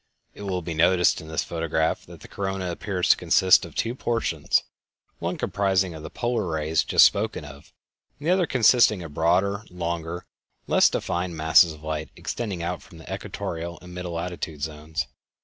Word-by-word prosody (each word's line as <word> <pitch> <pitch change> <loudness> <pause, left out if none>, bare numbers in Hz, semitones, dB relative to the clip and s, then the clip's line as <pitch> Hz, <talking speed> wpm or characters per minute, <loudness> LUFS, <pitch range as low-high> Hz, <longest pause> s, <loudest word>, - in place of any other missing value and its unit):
It - - -12
will 95 -3 -3
be 85 - -4
noticed 90 +3 +3
in 80 - -11
this 80 0 -1
photograph 80 -1 -1
that - - -13
the - - -11
corona 95 -2 -3
appears 90 +1 -2
to - - +7
consist 95 -2 +4
of 85 - -12
two 115 - -1
portions: 115 - 0 0.6
one - - -2
comprising 95 -2 +1
the 80 -1 -8
polar 120 -5 -1
rays 80 0 0
just - - +6
spoken 100 -6 0
of, 70 0 -13 0.5
and 145 - -6
the - - +4
other 185 -2 +3
consisting 115 -6 +4
of 80 - -8
the - - -14
broader, 95 +6 +1
longer, 85 -1 -4 0.4
and - - -21
less - - +5
defined 85 -1 -2
masses 80 +1 +5
of 75 0 -15
light 80 -1 -3
extending 100 -8 -4
out 90 +1 -3
from 85 - -15
the 80 - -8
equatorial 85 +1 -5
and 90 0 -11
middle 90 -1 -5
latitude 85 -3 -5
zones. 80 +1 -3
85 Hz, 185 wpm, -25 LUFS, 80-95 Hz, 0.6 s, to